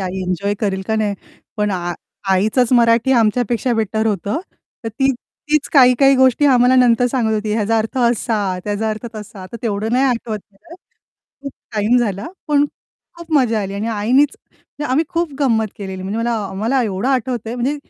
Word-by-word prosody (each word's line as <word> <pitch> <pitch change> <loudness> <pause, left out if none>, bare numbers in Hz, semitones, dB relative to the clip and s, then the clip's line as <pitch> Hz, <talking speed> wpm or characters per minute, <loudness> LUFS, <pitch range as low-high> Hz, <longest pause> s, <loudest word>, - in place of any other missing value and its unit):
I 190 0 -3
enjoy 185 +3 -1
करेल 190 -2 -1
का 220 - 0
नाही? 210 -2 0 0.4
पण 210 -1 0
आ 175 -2 -2 0.4
आईचंच 220 +6 +2
मराठी 235 +2 +4
आमच्यापेक्षा 240 +1 +1
बेटर 220 0 -1
होतं, 205 - -1 0.4
तर - - -1
तीच 270 +4 0 0.4
तीच 305 -1 +2
काही-काही 270 0 +6
गोष्टी 260 +2 +4
आम्हाला 250 -1 +4
नंतर 245 -1 +4
सांगत 235 -3 0
होती, 210 0 -2
ह्याचा 220 +1 +1
अर्थ 225 +4 -3
असा, 220 -5 0
त्याचा 210 +1 -2
अर्थ 215 +2 -5
तसा. 210 -2 -9
तर - - -5
तेवढं 220 0 -2
नाही 260 +2 +3
आठवत 235 -4 -1
खरं, 205 +12 -15 0.7
खूप 275 - -6 0.2
टाईम 215 +4 +2
झाला, 205 -4 -2 0.2
पण 290 -1 +3 0.5
खूप 340 -1 -10
मजा 230 -5 +2
आली. 195 0 -5
आणि 210 +3 -3
आईनीच 245 +7 +2
म्हणजे 295 - -10
आम्ही 310 +5 +2
खूप 335 -3 -2
गंमत 225 -5 +2
केलेली 190 -2 -6
म्हणजे 200 +4 -3
मला 235 +1 -1 0.2
आम्हाला 225 +8 0
एवढं 210 +2 -2
आठवतंय, 245 -3 -1
म्हणजे 260 +4 -1
225 Hz, 175 wpm, -18 LUFS, 205-255 Hz, 0.7 s, काही-काही